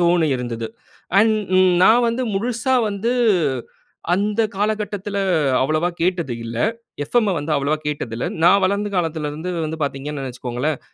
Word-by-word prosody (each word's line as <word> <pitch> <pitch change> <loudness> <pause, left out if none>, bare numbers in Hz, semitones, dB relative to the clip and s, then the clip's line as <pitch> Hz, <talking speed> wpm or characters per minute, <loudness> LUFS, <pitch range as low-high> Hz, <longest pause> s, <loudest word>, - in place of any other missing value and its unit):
தோணியிருந்தது 135 -10 +1 0.5
and 220 +1 +5 0.5
நான் 230 +6 +6
வந்து 235 +3 -1
முழுசா 240 +5 -1 0.2
வந்து 210 +4 -1 1.0
அந்த 205 +3 0 0.2
காலகட்டத்துல 205 -1 -2 0.4
அவ்வளவா 155 +5 +1
கேட்டது 170 -7 0
இல்ல. 115 0 -6 0.5
எஃப்எம் 220 +4 +2
வந்து 145 +2 -3
அவ்வளவா 140 +2 +1
கேட்டது 145 -6 -3
இல்ல. 120 - -2 0.2
நான் 195 +3 +6
வளர்ந்த 200 +2 0
காலத்துல 160 -3 -1
இருந்து 160 +5 -5
வந்து 160 +1 -4
பாத்தீங்கன்னு 140 0 -4
வச்சிகோங்களேன், 125 +4 -3
170 Hz, 125 wpm, -21 LUFS, 145-205 Hz, 1.0 s, நான்